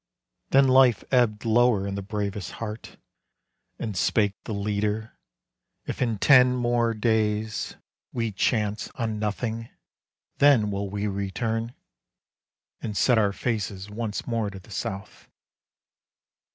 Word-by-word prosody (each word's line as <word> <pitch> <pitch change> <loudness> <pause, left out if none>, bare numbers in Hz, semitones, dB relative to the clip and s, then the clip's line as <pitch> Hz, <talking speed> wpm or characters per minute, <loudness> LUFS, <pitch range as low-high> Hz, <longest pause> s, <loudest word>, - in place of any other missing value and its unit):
Then 135 0 +5
life 130 -4 +5
ebbed 120 -4 +2
lower 115 -3 +3
in 100 - -3
the 100 - -3
bravest 100 -1 -4
heart, 110 0 -7 0.8
And 110 -4 -4
spake 100 +2 +2
the - - -5
leader, 105 +2 -2 0.7
"If - - -5
in 115 -4 +1
ten 125 +2 +6
more 120 -2 +1
days 110 -1 0 0.4
We 115 -2 -2
chance 105 +1 0
on 110 -3 -2
nothing, 110 +2 -3 0.7
then 130 -8 +5
will 100 0 -3
we 100 +1 -3
return, 110 +4 -2 1.1
And 105 -2 -4
set 125 -3 +4
our 100 -2 +2
faces 100 -3 -3
once 110 -1 -4
more 115 -3 -1
to 100 - -9
the 95 - -17
south." 95 +1 -6
110 Hz, 125 wpm, -26 LUFS, 100-115 Hz, 1.1 s, ten